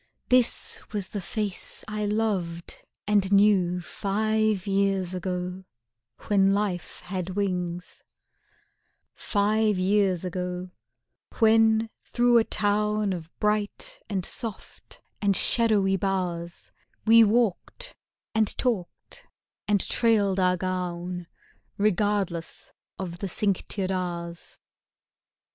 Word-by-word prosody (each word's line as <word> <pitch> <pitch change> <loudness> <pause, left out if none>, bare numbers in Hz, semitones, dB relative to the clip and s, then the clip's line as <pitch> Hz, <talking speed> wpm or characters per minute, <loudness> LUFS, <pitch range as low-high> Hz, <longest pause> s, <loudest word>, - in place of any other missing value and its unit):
This 250 -2 +3
was 200 -3 -3
the 205 - -4
face 205 0 -3
I 215 -1 -2
loved 195 -6 -2 0.3
and 205 -2 +2
knew 195 -3 +4
Five 215 +1 0
years 195 -2 0
ago, 180 0 -4 0.6
when 195 -1 +3
life 195 -5 -3
had 185 0 -5
wings; 180 -3 -3 1.1
Five 210 0 +1
years 190 -1 +2
ago, 180 0 -4 0.7
when 225 0 +4
through 240 -1 +3
a - - +3
town 210 -1 0
Of 165 -3 -7
bright 215 - -1
and 190 -4 -2
soft 225 -5 -8 0.2
and 200 -2 +3
shadowy 205 -3 +3
bowers 175 -3 -3 0.3
We 230 +1 +8
walked 235 - 0 0.4
and 220 -1 +1
talked 220 -9 -3 0.4
and 205 -2 +2
trailed 205 -5 +2
our 180 -1 +3
gown 180 -1 -3 0.5
Regardless 200 -4 -1 0.2
of 175 -2 -6
the 195 - -3
cinctured 195 0 -1
hours. 170 -2 -4
195 Hz, 100 wpm, -26 LUFS, 180-215 Hz, 1.1 s, We